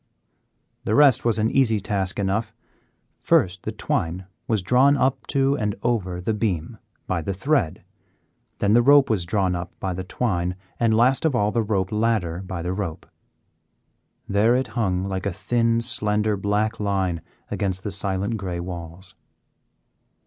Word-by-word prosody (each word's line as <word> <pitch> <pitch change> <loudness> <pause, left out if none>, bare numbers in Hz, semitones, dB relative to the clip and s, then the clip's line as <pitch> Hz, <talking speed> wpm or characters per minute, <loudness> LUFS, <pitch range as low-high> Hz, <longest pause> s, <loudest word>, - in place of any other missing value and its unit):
The 110 - 0
rest 140 -4 +5
was 115 -2 +2
an 110 +1 +1
easy 115 -5 +3
task 95 -2 -2
enough. 105 +3 -1 0.6
First 90 0 +2
the - - -4
twine 90 +3 -2 0.2
was 110 -5 0
drawn 130 +8 +4
up 130 0 0
to 140 0 +2
and 105 -6 -1
over 95 -7 -1
the 100 +5 -1
beam 100 -7 -2 0.3
by 90 -3 -1
the 95 +4 -3
thread, 120 - 0 0.7
then 100 0 +2
the 120 - +6
rope 140 0 +5
was 90 -6 0
drawn 95 -1 +1
up 85 0 -7
by 95 -1 -2
the 95 +1 -4
twine, 90 -3 -1 0.2
and 115 -2 +3
last 125 +3 +3
of 160 -5 +2
all 105 -3 +2
the 115 - +1
rope 100 -3 -1
ladder 105 -6 0
by 95 -3 -5
the 90 +1 -2
rope. 95 -5 -4 1.2
There 105 +4 +3
it 130 +1 -1
hung 95 -6 0
like 95 0 -3
a - - 0
thin, 115 +5 +1
slender 105 -2 0
black 105 +3 -1
line 95 -5 -1 0.3
against 95 -2 -2
the 105 - -3
silent 100 +3 -2
gray 90 -3 -4
walls. 85 +1 -6
105 Hz, 160 wpm, -23 LUFS, 95-115 Hz, 1.2 s, the